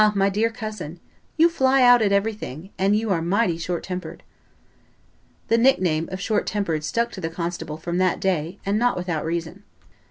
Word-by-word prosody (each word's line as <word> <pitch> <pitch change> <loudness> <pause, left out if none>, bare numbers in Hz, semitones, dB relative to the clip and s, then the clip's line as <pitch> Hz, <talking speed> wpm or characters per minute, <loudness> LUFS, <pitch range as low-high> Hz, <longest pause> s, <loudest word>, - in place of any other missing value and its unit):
my 195 0 +3
dear 215 +4 +1
cousin, 215 -7 -7 0.4
you 325 +1 +6
fly 270 -5 +3
out 245 -1 +7
at 205 -2 +2
everything, 200 -5 -2
and 195 +2 +3
you 220 0 0
are 170 -3 +1
mighty 185 +1 +1
short 170 +1 -3
tempered." 180 -3 -6 1.2
The 230 - +3
nickname 180 -11 +2
of 185 - -4
short 210 +1 -1
tempered 170 -8 -1
stuck 235 +8 -1
to 190 - -8
the 165 - -2
constable 170 -2 -4
from 170 +2 -3
that 185 -1 +2
day, 180 -1 -1
and 200 +2 +1
not 245 -3 +2
without 175 -3 -2
reason. 170 +3 -4
190 Hz, 180 wpm, -23 LUFS, 170-220 Hz, 1.2 s, out